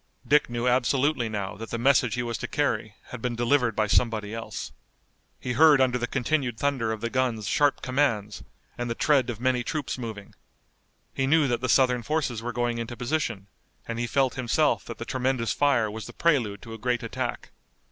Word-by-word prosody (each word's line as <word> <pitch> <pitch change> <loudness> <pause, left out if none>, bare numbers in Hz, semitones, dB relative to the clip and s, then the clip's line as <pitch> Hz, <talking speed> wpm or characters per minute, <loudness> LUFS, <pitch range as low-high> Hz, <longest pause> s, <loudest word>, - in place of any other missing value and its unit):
Dick 150 -2 +4
knew 120 +1 -2
absolutely 130 0 +2
now 100 -2 -4
that 115 +1 -7
the 115 - -3
message 125 -1 +3
he 125 - -1
was 120 -1 -3
to - - -4
carry 115 -7 -1
had 125 - -8
been 125 0 -2
delivered 120 -1 +2
by 110 - +2
somebody 110 -1 +1
else. 115 0 -6 0.7
He 125 - -3
heard 150 0 +6
under 125 -1 +2
the 120 - -2
continued 130 -2 -1
thunder 130 -5 0
of 110 -1 -4
the 115 - -2
guns 120 -5 0
sharp 145 +5 +2
commands, 120 -6 0 0.4
and 120 0 -2
the 115 - -2
tread 140 -3 +2
of 115 -3 -4
many 125 0 +1
troops 145 -1 -3
moving. 110 -4 -7 0.8
He 135 - 0
knew 155 0 +4
that 120 -2 -1
the 130 - -2
Southern 125 -1 +4
forces 135 -5 -1
were 120 +1 -3
going 120 0 -1
into 115 +1 -5
position, 125 -6 -2 0.4
and 115 0 -4
he 120 - -1
felt 135 +1 +1
himself 130 +4 +1
that 115 - -7
the 115 - -6
tremendous 130 -2 -1
fire 130 -7 +2
was 110 +1 -7
the - - -10
prelude 125 -12 +1
to 115 -1 -9
a 115 - -8
great 125 +1 -1
attack. - - -4
120 Hz, 200 wpm, -26 LUFS, 115-135 Hz, 0.8 s, heard